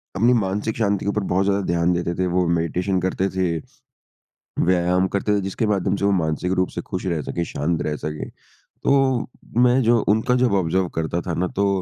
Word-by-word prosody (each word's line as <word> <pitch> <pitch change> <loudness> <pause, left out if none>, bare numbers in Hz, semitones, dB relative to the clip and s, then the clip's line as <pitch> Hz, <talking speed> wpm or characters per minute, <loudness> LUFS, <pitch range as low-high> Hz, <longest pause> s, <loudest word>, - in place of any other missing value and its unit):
अपनी 120 +5 +4
मानसिक 105 +1 -1
शांति 100 -4 0
के - - +1
ऊपर 105 0 0
बहुत 95 +1 +1
ज़्यादा 100 0 +1
ध्यान 85 +1 +1
देते 85 0 -1
थे। 95 - 0
वो 90 0 +1
मेडिटेशन 90 +3 0
करते 95 +1 0
थे। 90 -3 0 1.1
व्यायाम 90 +1 +2
करते 100 +2 0
थे - - 0
जिसके 95 +4 -2
माध्यम 100 -2 +1
से 100 - -1
वो 100 - +3
मानसिक 85 -1 0
रूप 95 - +1
से - - -5
खुश 95 -1 -5
रह 85 -4 -1
सके, 85 +5 -3
शांत 80 +2 -2
रह 75 - -2
सके। 75 0 -5
तो 135 -3 -1 0.3
मैं 125 +1 +4
जो 115 0 +4
उनका 110 +4 +2
जब 125 -4 +2
ऑब्ज़र्व 95 0 +1
करता 85 +2 -1
था 85 - -4
ना 90 +2 0
तो 100 +1 +2
95 Hz, 205 wpm, -22 LUFS, 85-105 Hz, 1.1 s, अपनी